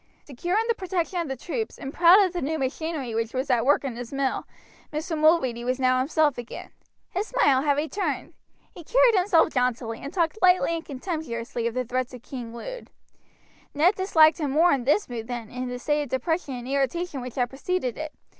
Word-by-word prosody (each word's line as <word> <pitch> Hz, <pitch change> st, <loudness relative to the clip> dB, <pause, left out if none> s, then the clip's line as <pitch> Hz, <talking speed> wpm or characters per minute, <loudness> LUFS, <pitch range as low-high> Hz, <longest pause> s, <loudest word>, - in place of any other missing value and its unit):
Secure 345 Hz, -, -2 dB
in 450 Hz, -, +2 dB
the 465 Hz, -, +3 dB
protection 370 Hz, -3 st, -2 dB
of 335 Hz, -, -2 dB
the 270 Hz, -, -3 dB
troops, 440 Hz, -, -4 dB
and 270 Hz, +1 st, -7 dB
proud 350 Hz, +3 st, +7 dB
of 370 Hz, -, -3 dB
the 350 Hz, -, -3 dB
new 315 Hz, +4 st, -1 dB
machinery 275 Hz, -2 st, -3 dB
which 230 Hz, +2 st, -2 dB
was 260 Hz, +1 st, -1 dB
at 240 Hz, 0 st, +2 dB
work 290 Hz, -, +4 dB
in 265 Hz, -4 st, -4 dB
his 240 Hz, 0 st, -7 dB
mill, 275 Hz, -1 st, -1 dB, 0.4 s
Mr. 320 Hz, +3 st, -3 dB
Mulready 305 Hz, -7 st, +3 dB
was 255 Hz, +2 st, -1 dB
now 255 Hz, -1 st, +3 dB
himself 295 Hz, 0 st, +1 dB
again. 240 Hz, -, -8 dB, 0.4 s
His 395 Hz, +4 st, -2 dB
smile 275 Hz, -, +3 dB
had 285 Hz, -1 st, +1 dB
returned. 320 Hz, +7 st, -2 dB, 0.4 s
He 345 Hz, -, -11 dB
carried -, -, +4 dB
himself 365 Hz, -5 st, +3 dB
jauntily, 245 Hz, -3 st, -1 dB
and 280 Hz, -, -6 dB
talked 340 Hz, +2 st, 0 dB
lightly 365 Hz, -2 st, +4 dB
and 330 Hz, -1 st, -3 dB
contemptuously 255 Hz, -6 st, -4 dB
of 235 Hz, -, -4 dB
the 255 Hz, 0 st, -1 dB
threats 255 Hz, +1 st, -2 dB
of 245 Hz, -, -13 dB
King 245 Hz, -4 st, -7 dB
Lud. -, -, -8 dB, 0.9 s
Ned 330 Hz, +7 st, +4 dB
disliked 340 Hz, -4 st, +4 dB
him 295 Hz, -3 st, -1 dB
more 320 Hz, +6 st, +4 dB
in 265 Hz, -4 st, 0 dB
this 300 Hz, +10 st, +2 dB
mood 230 Hz, -2 st, -6 dB
than 240 Hz, -3 st, -6 dB
in 250 Hz, 0 st, -4 dB
the 250 Hz, -, -4 dB
state 295 Hz, +4 st, 0 dB
of 290 Hz, -, -5 dB
depression 295 Hz, +1 st, -1 dB
and 245 Hz, 0 st, -7 dB
irritation 280 Hz, +3 st, -1 dB
which 250 Hz, -1 st, -7 dB
had 245 Hz, -2 st, 0 dB
preceded 270 Hz, -1 st, -2 dB
it. 310 Hz, 0 st, -5 dB
285 Hz, 210 wpm, -25 LUFS, 250-340 Hz, 0.9 s, proud